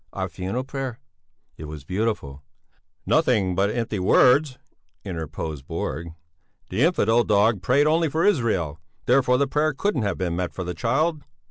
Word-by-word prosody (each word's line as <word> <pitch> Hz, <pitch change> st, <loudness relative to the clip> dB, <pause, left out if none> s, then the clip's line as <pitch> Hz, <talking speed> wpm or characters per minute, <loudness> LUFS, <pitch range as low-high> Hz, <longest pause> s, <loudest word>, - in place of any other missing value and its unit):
"Our -, -, -3 dB
funeral 95 Hz, +8 st, -4 dB
prayer!" 135 Hz, -3 st, -5 dB, 0.6 s
"It 80 Hz, -, -8 dB
was 75 Hz, -2 st, -8 dB
beautiful!" 90 Hz, -6 st, -3 dB, 0.6 s
"Nothing 110 Hz, -, +2 dB
but 100 Hz, +3 st, +1 dB
empty 115 Hz, -2 st, -2 dB
words," 130 Hz, +8 st, +4 dB, 0.5 s
interposed 80 Hz, -5 st, -5 dB
Borg. 80 Hz, +4 st, -4 dB, 0.6 s
"The 95 Hz, +6 st, -1 dB
infidel 120 Hz, -, +3 dB
dog 105 Hz, -1 st, +2 dB
prayed 130 Hz, +10 st, +3 dB
only 160 Hz, +1 st, +2 dB
for 160 Hz, +4 st, 0 dB
Israel; 110 Hz, -, +1 dB, 0.3 s
therefore 125 Hz, 0 st, +3 dB
the 140 Hz, -, +2 dB
prayer 150 Hz, +2 st, 0 dB
couldn't 160 Hz, -, 0 dB
have 100 Hz, -3 st, -1 dB
been 90 Hz, -3 st, -2 dB
meant 90 Hz, 0 st, -3 dB
for 95 Hz, -, -4 dB
the 90 Hz, 0 st, -4 dB
child." 150 Hz, -, 0 dB
110 Hz, 150 wpm, -24 LUFS, 90-135 Hz, 0.6 s, words